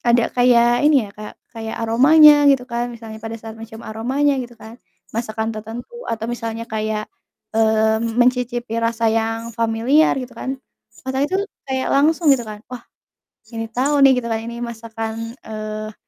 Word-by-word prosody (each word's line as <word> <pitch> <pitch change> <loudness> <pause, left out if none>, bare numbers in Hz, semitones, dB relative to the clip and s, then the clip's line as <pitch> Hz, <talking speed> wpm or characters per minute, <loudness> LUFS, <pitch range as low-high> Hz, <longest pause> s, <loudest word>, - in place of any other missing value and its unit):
ada 235 -1 +2
kayak 240 -1 +4
ini 290 -5 +4
ya 200 - -10
Kak, 210 0 -10 0.2
kayak 225 -1 -6
aromanya 290 +6 +6
gitu 270 -3 +3
kan, 240 -1 -3
misalnya 225 -2 -9
pada 225 +1 -6
saat 225 0 -9
mencium 225 0 -11
aromanya 265 +6 0
gitu 240 -1 -9
kan, 225 +2 -13 0.3
masakan 220 0 -3
tertentu 225 - -8 0.2
atau 225 -1 -3
misalnya 230 -1 -4
kayak, 215 -1 -3 0.5
mmm, 220 +1 +2
mencicipi 245 -2 +1
rasa 230 -1 +1
yang 225 +1 -2
familiar 230 +8 +2
gitu 255 -1 -5
kan, 265 +1 -5 0.5
otak 265 +2 -1
itu 380 - 0 0.3
kayak 260 0 -1
langsung 305 +1 +4
gitu, 265 - +2
kan 210 +1 -9
wah, 250 - -6 0.7
ini 225 0 -4
tahu 275 +4 +1
nih 265 -2 +6
gitu 235 - -4
kan 225 -1 -1
ini 235 +1 -7
masakan, 225 -1 -5 0.3
eee, 215 0 -6
230 Hz, 160 wpm, -20 LUFS, 225-250 Hz, 0.7 s, aromanya